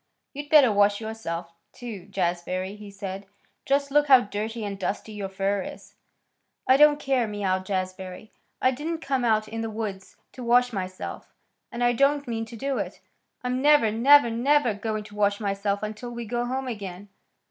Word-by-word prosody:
"You'd 290 +1 -7
better 285 -7 +7
wash 205 0 +3
yourself, 175 -7 -5 0.2
too, 215 -7 -8
Jazbury," 185 +1 -2
he 210 -1 -11
said. 195 0 -7 0.4
"Just 280 0 +1
look 295 +1 +4
how 260 -3 +8
dirty 215 +1 -4
and 200 -1 -5
dusty 195 +3 -3
your 205 -2 -5
fur 195 +1 -1
is." - - -9 0.7
"I 260 - +7
don't 295 +1 +6
care," 265 -5 +1
mewed 190 -3 -2
Jazbury. 185 +1 -4 0.3
"I 255 - +3
didn't 320 +5 -4
come 270 -4 -1
out 215 -2 +2
in 225 +1 -5
the 225 - -3
woods 210 -3 -6 0.2
to 255 - -9
wash 245 +1 +3
myself, 185 -2 -6 0.4
and 240 +1 -3
I 240 0 +4
don't 280 +3 +2
mean 225 -1 -2
to 230 +1 -11
do 270 +3 -2
it. - - -5 0.4
I'm 250 +1 -1
never, 290 -6 +5
never, 245 +2 +6
never 250 +1 +2
going 215 +1 -3
to 205 0 -13
wash 205 -1 +1
myself 200 0 -1
until 215 +3 -5
we 235 -1 -6
go 240 +2 -2
home 260 +1 -3
again." 200 -4 -6
220 Hz, 180 wpm, -26 LUFS, 200-250 Hz, 0.7 s, how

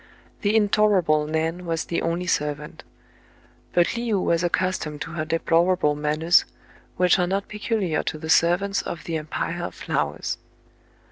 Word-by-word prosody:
The 205 0 +1
intolerable 200 -8 +3
Nan 160 +3 -1
was 165 -2 -2
the 170 - -2
only 170 +2 -1
servant; 150 -4 -2 0.9
but 175 +4 +2
Le 235 -2 -1
ou - - +2
was 170 -1 +1
accustomed 175 -4 -1
to - - -5
her 155 -2 -3
deplorable 165 0 +2
manners, 155 +3 +3 0.5
which 180 +1 +4
are 180 - +2
not 195 +2 -1
peculiar 210 -6 -1
to - - -4
the 160 +1 -7
servants 175 +5 +3
of 170 - -6
the 165 - -4
Em 155 -1 -4
pire 170 +2 -3
of - - -5
Flowers. - - -2
170 Hz, 155 wpm, -24 LUFS, 160-185 Hz, 0.9 s, which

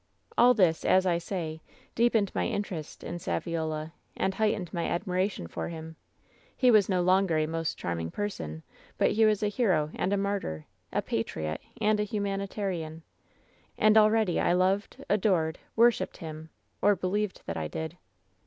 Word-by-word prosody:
"All 245 +1 +6
this, 175 -6 +3
as 190 0 +4
I 170 -2 +2
say, 165 -3 -4 0.3
deepened 225 -4 +2
my - - 0
interest 175 -7 -4
in 175 - -5
Saviola, 160 -3 -2 0.3
and 190 - 0
heightened 205 -5 0
my 170 -2 -1
admiration 185 - -1
for 85 - -5
him. 160 -1 -8 0.6
He 250 -1 +5
was 210 -3 +5
no 180 -2 +2
longer 185 -2 +3
a 155 - +2
most 165 0 -2
charming 85 -1 -3
person, 80 - -4 0.3
but - - +3
he 220 +1 +4
was 215 -1 +2
a - - +3
hero 185 -9 +1
and 190 - -1
a 200 - +2
martyr, 195 - -2 0.3
a - - 0
patriot 80 0 -3 0.2
and 215 -1 +2
a - - +2
humanitarian. 195 -6 -3 0.7
And 215 0 +5
already 215 -3 +4
1 175 - +3
loved, 190 +2 0
adored, 180 -6 +1 0.2
worshiped 235 +1 +3
him, 160 -1 -8 0.3
or 205 0 +5
believed 195 +3 -2
that 85 - -4
I 80 -1 -2
did. 160 - -5
185 Hz, 160 wpm, -29 LUFS, 160-205 Hz, 0.7 s, All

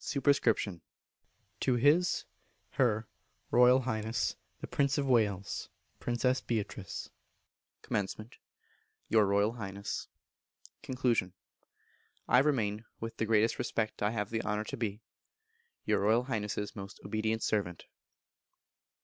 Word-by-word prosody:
_ 125 - +2 0.8
To 130 - +2
His 150 +8 +3 0.5
(Her) 110 -4 +1 0.4
Royal 125 +2 +6
Highness 110 -2 -1 0.2
the - - -5
Prince 140 -1 +1
of 140 - +1
Wales 105 -7 +1 0.3
(Princess 125 +2 +1
Beatrice). 105 -3 -4 0.7
Comm. 105 +3 -3 0.8
Your 110 -3 +5
Royal 100 +2 +3
Highness. 100 -3 -5 0.7
Con. 120 -8 0 0.9
I 125 - +6
remain, 115 -7 +1 0.2
with 115 0 -6
the 110 - -1
greatest 110 +1 +3
respect 110 -1 -2
(I 105 - +3
have 105 -2 -2
the 110 -1 0
honour 105 -1 -1
to 125 - -5
be), 110 -2 -3 0.8
your - - +2
Royal 110 +4 +3
Highness's 105 -4 -3
most 100 -1 -8
obedient 110 +2 -1
servant. 95 -5 -1
110 Hz, 110 wpm, -32 LUFS, 105-125 Hz, 0.9 s, Royal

